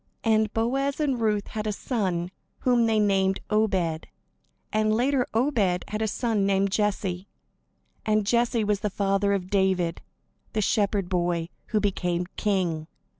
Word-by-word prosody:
And 220 -1 +2
Boaz 270 +6 0
and 270 -6 0
Ruth 210 -2 0
had 215 0 -4
a - - +1
son, 185 -6 -2 0.3
whom 240 -2 +3
they 220 -1 +2
named 195 -2 +2
Obed; 190 -7 +1 0.7
and 215 0 +2
later 250 +3 +2
Obed 220 -7 +1
had 215 +1 -3
a 220 - +1
son 220 -1 0
named 195 0 +2
Jesse; 195 -2 -1 0.8
and 215 -1 +1
Jesse 235 +1 +2
was 210 -1 +1
the 210 - -1
father 195 0 +1
of 185 -2 -3
David, 190 -4 +1 0.5
the 215 - +1
shepherd 200 -2 +1
boy 175 -2 -1 0.2
who 215 - +1
became 180 -3 -1
king. 175 -7 0
205 Hz, 145 wpm, -26 LUFS, 190-220 Hz, 0.8 s, whom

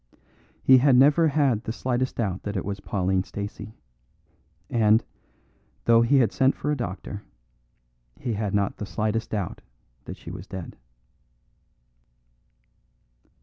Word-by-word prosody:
He 130 -1 +7
had 135 0 +5
never 145 +5 +5
had 140 -7 +1
the - - -3
slightest 130 +2 -2
doubt 100 -5 -2
that 100 -1 -4
it - - -3
was 100 0 -4
Pauline 95 -2 0
Stacey; 105 +2 -7 0.9
and, 110 0 +3 0.8
though 115 0 +6
he 115 +4 +4
had 120 -4 +3
sent 135 0 +2
for 150 - -2
a - - +1
doctor, 100 -4 -5 1.0
he 120 - -3
had 105 -1 -2
not 100 -1 0
the 105 - -5
slightest 110 +2 -2
doubt 100 -5 -4 0.4
that - - -7
she - - -10
was - - -9
dead. 95 -3 -7
110 Hz, 135 wpm, -25 LUFS, 100-130 Hz, 1.0 s, He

